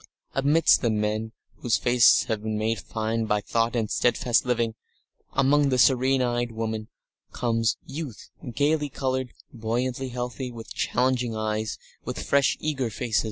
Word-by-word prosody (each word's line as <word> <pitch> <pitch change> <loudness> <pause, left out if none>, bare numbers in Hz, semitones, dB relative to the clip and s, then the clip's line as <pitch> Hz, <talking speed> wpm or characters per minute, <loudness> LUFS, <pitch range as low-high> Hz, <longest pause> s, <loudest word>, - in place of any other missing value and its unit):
Amidst 145 +4 +4
the 120 - +1
men 110 +1 -1 0.3
whose 120 - +1
faces 120 -1 +5
have 110 -3 -2
been 110 0 -2
made 110 0 0
fine 110 +2 -2
by 105 -1 +1
thought 115 +3 0
and 115 -2 0
steadfast 120 0 +2
living, 115 -2 +1 0.6
among 140 +1 +3
the 130 - +1
serene 130 +1 +4
eyed 120 -1 -1
women, 110 -1 -3 0.5
comes 115 -2 0
youth, 140 -7 -7 0.2
gaily 145 +3 +1
coloured, 130 -2 -2 0.2
buoyantly 125 +3 -2
healthy, 125 +1 -4
with 115 -2 -9
challenging 125 -2 0
eyes, 110 0 -2 0.3
with - - -5
fresh 140 -1 +3
and - - -12
eager 135 -6 0
face.... 110 0 -1
120 Hz, 150 wpm, -26 LUFS, 110-130 Hz, 0.6 s, faces